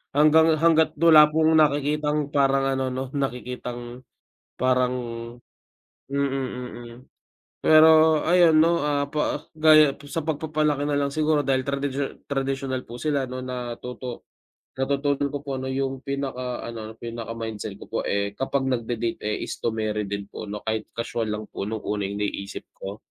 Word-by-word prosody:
hanggang 155 Hz, +2 st, +6 dB
hangga't 160 Hz, -1 st, +4 dB
wala 155 Hz, -1 st, +7 dB
pong 160 Hz, 0 st, +4 dB
nakikitang 150 Hz, 0 st, +1 dB
parang 135 Hz, -1 st, +3 dB
ano 130 Hz, -1 st, -1 dB
'no, 130 Hz, +1 st, -3 dB
nakikitang 125 Hz, -2 st, -5 dB, 0.5 s
parang 125 Hz, 0 st, +2 dB, 1.1 s
mm, 140 Hz, +1 st, 0 dB, 0.6 s
mm. 115 Hz, -, -11 dB, 0.7 s
Pero 155 Hz, 0 st, +6 dB
ayun 170 Hz, -2 st, +5 dB
'no, 170 Hz, +2 st, +4 dB
ah, 145 Hz, 0 st, 0 dB
pa 150 Hz, -, -1 dB
gaya 155 Hz, -2 st, +6 dB
po 145 Hz, -, -14 dB
sa 160 Hz, +1 st, -3 dB
pagpapalaki 150 Hz, -2 st, 0 dB
nalang 145 Hz, -1 st, 0 dB
siguro 155 Hz, -1 st, +1 dB
dahil 130 Hz, 0 st, +2 dB
tradisyo 140 Hz, 0 st, -1 dB, 0.2 s
tradisyonal 135 Hz, -2 st, -2 dB
po 120 Hz, -, -7 dB
sila 140 Hz, 0 st, -1 dB
ano 130 Hz, 0 st, -5 dB
natuto 125 Hz, 0 st, -6 dB, 0.6 s
natututo 140 Hz, +1 st, 0 dB
ko 145 Hz, +1 st, -4 dB
po 140 Hz, -, -8 dB
ano 130 Hz, -, -4 dB
'yung 135 Hz, 0 st, -2 dB
pinaka 130 Hz, -2 st, -4 dB
ano, 110 Hz, -1 st, -7 dB
pinaka-mindset 115 Hz, -3 st, -6 dB
ko -, -, -12 dB
po -, -, -1 dB
eh 100 Hz, 0 st, 0 dB
kapag 135 Hz, +1 st, 0 dB
nagde-date 115 Hz, -1 st, -2 dB
eh, 105 Hz, -, -2 dB
is -, -, -6 dB
to 115 Hz, -1 st, -1 dB
marry 105 Hz, -1 st, -2 dB
din 100 Hz, 0 st, -3 dB
po -, -, -7 dB
'no 105 Hz, 0 st, -6 dB
kahit 110 Hz, -1 st, -2 dB
kaswal 115 Hz, -1 st, -2 dB
lang 105 Hz, 0 st, -3 dB
po 100 Hz, -, -4 dB
nung 110 Hz, 0 st, -4 dB
una 105 Hz, -1 st, -2 dB
'yung 100 Hz, +1 st, -5 dB
naiisip 100 Hz, -1 st, -4 dB
ko. 100 Hz, +2 st, -8 dB
135 Hz, 155 wpm, -24 LUFS, 120-150 Hz, 1.1 s, wala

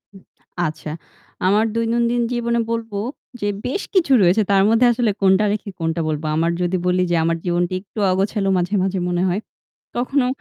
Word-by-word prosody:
উ -, -, -10 dB, 0.5 s
আচ্ছা। 155 Hz, 0 st, -6 dB, 0.6 s
আমার 210 Hz, +3 st, +3 dB
দৈনন্দিন 235 Hz, +1 st, +1 dB
জীবনে 235 Hz, -1 st, 0 dB
বলব 230 Hz, -1 st, -3 dB, 0.5 s
যে 205 Hz, -, 0 dB, 0.2 s
বেশ 280 Hz, +11 st, -2 dB
কিছু 360 Hz, -7 st, +2 dB
রয়েছে 185 Hz, +4 st, +4 dB
তার 195 Hz, -1 st, +5 dB
মধ্যে 230 Hz, +2 st, +4 dB
আসলে 235 Hz, -2 st, +1 dB
কোনটা 195 Hz, +2 st, +4 dB
রেখে 210 Hz, -1 st, -4 dB
কোনটা 165 Hz, 0 st, -1 dB
বলবো। 155 Hz, 0 st, -2 dB
আমার 165 Hz, +2 st, +1 dB
যদি 180 Hz, +1 st, 0 dB
বলি 180 Hz, 0 st, +2 dB
যে -, -, +3 dB
আমার 165 Hz, 0 st, +1 dB
জীবনটা 175 Hz, 0 st, 0 dB
একটু 205 Hz, +2 st, -10 dB
অগোছালো 195 Hz, +1 st, 0 dB
মাঝে, 180 Hz, +3 st, 0 dB
মাঝে 190 Hz, 0 st, -1 dB
মনে 175 Hz, 0 st, 0 dB
হয়। 185 Hz, +2 st, 0 dB, 0.6 s
কখনো 255 Hz, +2 st, +1 dB
195 Hz, 175 wpm, -20 LUFS, 175-230 Hz, 0.6 s, তার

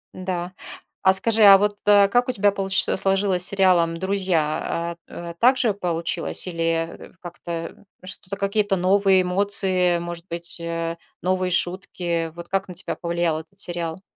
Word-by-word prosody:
Н-да. 185 Hz, -1 st, -4 dB, 0.5 s
А 190 Hz, -, +5 dB
скажи, 220 Hz, +3 st, +1 dB
а 195 Hz, -1 st, +10 dB
вот, 205 Hz, +1 st, 0 dB
э, 205 Hz, -1 st, +6 dB
как 245 Hz, +5 st, +1 dB
у -, -, +3 dB
тебя 205 Hz, -2 st, +2 dB
получи 195 Hz, -1 st, 0 dB
сложилось 195 Hz, -1 st, +1 dB
с -, -, +4 dB
сериалом 180 Hz, -4 st, +2 dB
"Друзья"? 170 Hz, -3 st, -1 dB
А 170 Hz, 0 st, -8 dB
т -, -, -32 dB
так 255 Hz, +2 st, +5 dB
же 230 Hz, -5 st, +1 dB
получилось 175 Hz, -2 st, -3 dB
или, 165 Hz, -2 st, -3 dB, 0.3 s
э, -, -, -13 dB
как-то, 170 Hz, 0 st, -7 dB, 0.2 s
что-то, 195 Hz, 0 st, -3 dB
какие-то 200 Hz, 0 st, 0 dB
новые 190 Hz, +1 st, +3 dB
эмоции, 185 Hz, -1 st, +2 dB
может 170 Hz, 0 st, -7 dB
быть, 170 Hz, 0 st, +1 dB
э, 165 Hz, 0 st, -3 dB, 0.2 s
новые 185 Hz, 0 st, 0 dB
шутки. 175 Hz, -2 st, -2 dB
Вот 170 Hz, 0 st, -9 dB
как 195 Hz, +1 st, -2 dB
на 180 Hz, -, -7 dB
тебя 185 Hz, -, -2 dB
повлиял 170 Hz, -2 st, -1 dB
этот 195 Hz, +5 st, -15 dB
сериал 170 Hz, -1 st, -2 dB
185 Hz, 160 wpm, -22 LUFS, 170-195 Hz, 0.5 s, а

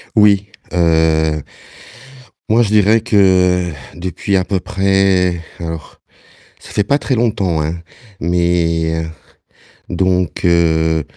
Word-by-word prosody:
Oui, 100 Hz, -2 st, +4 dB, 0.2 s
heu 80 Hz, -3 st, +2 dB, 1.1 s
moi 115 Hz, +2 st, +4 dB
je 105 Hz, -, -2 dB
dirais 110 Hz, +1 st, +4 dB
que 90 Hz, -4 st, +2 dB, 0.2 s
depuis 90 Hz, +3 st, -2 dB
à 95 Hz, -, 0 dB
peu 95 Hz, 0 st, -2 dB
près, 95 Hz, -2 st, +1 dB, 0.2 s
alors 80 Hz, -2 st, -7 dB, 0.6 s
ça -, -, -14 dB
fait 105 Hz, -, 0 dB
pas 140 Hz, +8 st, +2 dB
très 130 Hz, -, -1 dB
longtemps, 100 Hz, -8 st, 0 dB
hein, 80 Hz, +3 st, -3 dB, 0.4 s
mais 85 Hz, -1 st, 0 dB, 0.9 s
donc, 90 Hz, 0 st, -1 dB
heu, 80 Hz, -2 st, +2 dB
90 Hz, 105 wpm, -16 LUFS, 80-95 Hz, 1.1 s, Oui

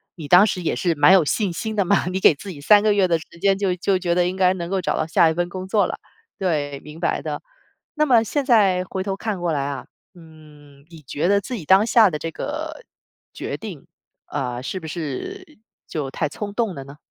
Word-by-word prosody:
你 160 Hz, -4 st, -8 dB
当 180 Hz, +6 st, +7 dB
时 185 Hz, -3 st, -3 dB
也 -, -, 0 dB
是 170 Hz, -3 st, 0 dB
蛮 145 Hz, +5 st, +6 dB
有 185 Hz, -4 st, +6 dB
信 190 Hz, +4 st, -1 dB
心 220 Hz, +5 st, -4 dB
的 200 Hz, -2 st, +1 dB
嘛。 195 Hz, 0 st, +2 dB
你 185 Hz, +1 st, -2 dB
给 190 Hz, -, +6 dB
自 190 Hz, +7 st, -10 dB
己 155 Hz, -, -8 dB
3 205 Hz, +8 st, +5 dB
个 215 Hz, 0 st, +3 dB
月 195 Hz, -2 st, +3 dB
的 165 Hz, -2 st, +1 dB
时 160 Hz, -, -12 dB
间， 195 Hz, +2 st, +3 dB
就 195 Hz, -2 st, 0 dB
就 185 Hz, +1 st, 0 dB
觉 175 Hz, -2 st, 0 dB
得 175 Hz, 0 st, +2 dB
应 180 Hz, -, -3 dB
该 185 Hz, -1 st, +3 dB
能 170 Hz, -2 st, -5 dB
够 195 Hz, -1 st, 0 dB
找 -, -, -1 dB
到 -, -, 0 dB
下 160 Hz, +1 st, +4 dB
一 -, -, 0 dB
份 175 Hz, +1 st, 0 dB
工 185 Hz, +1 st, -7 dB
作 205 Hz, +1 st, +2 dB
了。 -, -, -5 dB, 0.4 s
对， 145 Hz, -7 st, -2 dB
明 150 Hz, +2 st, -11 dB
白 -, -, -1 dB
的。 -, -, -5 dB, 0.6 s
那 305 Hz, -, +3 dB
么 245 Hz, -6 st, +5 dB
现 285 Hz, +6 st, -1 dB
在 200 Hz, -8 st, +4 dB
回 185 Hz, +1 st, -4 dB
头 195 Hz, 0 st, -2 dB
看 205 Hz, -1 st, -4 dB
过 175 Hz, -2 st, -1 dB
来 140 Hz, -2 st, -1 dB
啊， 140 Hz, -2 st, -5 dB, 0.3 s
嗯， 150 Hz, -4 st, -17 dB
你 165 Hz, -2 st, -13 dB
觉 150 Hz, +5 st, -2 dB
得 200 Hz, 0 st, +4 dB
自 245 Hz, +6 st, -6 dB
己 200 Hz, -, -6 dB
当 190 Hz, +6 st, +5 dB
下 225 Hz, -3 st, +6 dB
的 150 Hz, -3 st, -4 dB
这 165 Hz, -, -4 dB
个 165 Hz, -, -6 dB, 0.5 s
决 -, -, -5 dB
定， -, -, -9 dB, 0.4 s
啊， 125 Hz, -3 st, -4 dB
是 185 Hz, +8 st, -5 dB
不 -, -, -9 dB
是， 175 Hz, -, -6 dB, 0.3 s
就 140 Hz, -4 st, -4 dB
太 150 Hz, -, -1 dB
冲 200 Hz, +7 st, -6 dB
动 215 Hz, -4 st, -1 dB
了 135 Hz, -, -7 dB
呢？ 140 Hz, +2 st, -13 dB
180 Hz, 255 characters per minute, -22 LUFS, 155-200 Hz, 0.6 s, 当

